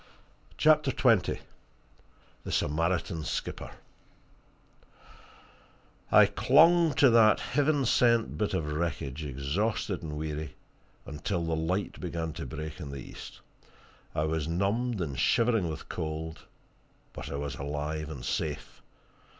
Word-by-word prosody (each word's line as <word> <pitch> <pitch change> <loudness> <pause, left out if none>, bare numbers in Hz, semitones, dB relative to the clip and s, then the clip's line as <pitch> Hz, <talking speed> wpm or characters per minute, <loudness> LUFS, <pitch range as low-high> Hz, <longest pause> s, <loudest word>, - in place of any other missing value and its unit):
CHAPTER 155 -2 +4
XX 120 -6 +3 1.1
THE - - -6
SAMARITAN 80 +1 0
SKIPPER - - -4 2.4
I - - +8
clung 165 +3 +4
to 135 -4 +6
that 115 -2 +6
heaven 145 0 +1
sent 115 -1 +3
bit 105 -2 -1
of 75 -5 -2
wreckage, 75 -3 -3
exhausted 80 - -2
and 75 -3 -5
weary, 75 -1 -4 0.5
until 85 +5 -3
the 80 0 0
light 90 +5 -2
began 85 -3 -4
to - - -6
break 75 +2 -6
in 75 -5 -6
the 70 - -6
east. - - -10 0.7
I 75 - +1
was 80 -1 -1
numbed 100 +6 0
and 70 -7 -3
shivering 115 -7 +2
with 80 - -7
cold 80 0 -5 0.7
but - - -7
I - - -4
was 70 0 -3
alive 75 +2 -4
and 65 -5 -7
safe. 75 +2 -3
80 Hz, 120 wpm, -29 LUFS, 75-110 Hz, 2.4 s, I